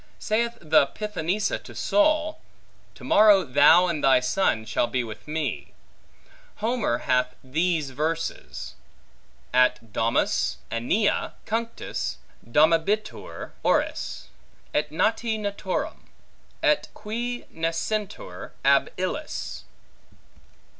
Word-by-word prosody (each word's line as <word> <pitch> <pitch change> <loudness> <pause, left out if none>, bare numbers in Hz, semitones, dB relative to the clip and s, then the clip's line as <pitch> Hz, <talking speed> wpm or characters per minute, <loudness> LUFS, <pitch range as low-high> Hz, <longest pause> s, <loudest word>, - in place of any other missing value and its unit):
Saith 235 +2 -1
the 150 -3 +4
Pythonissa 210 +2 -2
to - - -13
Saul, 310 0 +2 0.5
To - - -14
morrow 205 -2 +6
thou 150 +5 +6
and 170 -4 -2
thy 135 -1 +6
son 125 -3 +1
shall 110 +2 0
be 125 0 -1
with 110 -2 -9
me. 155 +1 -3 0.8
Homer 220 - 0
hath 125 -1 +1
these 155 +1 0
verses: 160 +4 -3 0.8
At 125 -3 +2
domus 115 +1 +1
AEneae 125 - +1
cunctis 230 +1 -3 0.3
dominabitur 165 - +1
oris, - - -1 0.4
Et 150 0 0
nati 220 +6 +1
natorum, 205 -2 -4 0.5
et 300 -1 +3
qui 240 +3 -4
nascentur 195 - -3
ab - - +5
illis. - - -4
170 Hz, 95 wpm, -25 LUFS, 135-215 Hz, 0.8 s, morrow